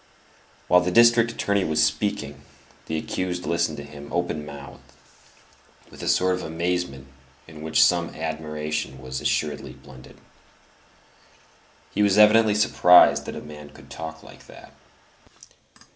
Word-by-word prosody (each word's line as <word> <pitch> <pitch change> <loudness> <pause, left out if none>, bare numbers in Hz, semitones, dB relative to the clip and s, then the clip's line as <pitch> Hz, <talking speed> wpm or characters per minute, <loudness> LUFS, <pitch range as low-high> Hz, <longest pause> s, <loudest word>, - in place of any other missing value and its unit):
While 90 0 +5
the 90 - -1
district 115 +3 +5
attorney 100 -3 -1
was 75 -2 +1
speaking, 75 -4 -2 0.5
the 80 - -3
accused 90 +2 -4
listened 85 -1 -1
to 70 - -7
him 70 0 -12
open 85 -3 -2
mouthed, 70 -2 -11 1.1
with - - -12
a - - -5
sort 95 0 +2
of 90 - -3
amazement 85 -4 -3 0.4
in 80 -1 -12
which 80 -1 +3
some - - +2
admiration 75 -3 -5
was 65 -1 -6
assuredly 75 -2 -2
blended. 65 -1 -16 1.7
He - - -2
was 100 -1 +3
evidently 105 0 +5
surprised 90 -4 +5
that - - -6
a - - -7
man 75 -1 -11
could - - -17
talk 80 -1 -8
like - - -16
that. - - -15
80 Hz, 135 wpm, -23 LUFS, 75-90 Hz, 1.7 s, While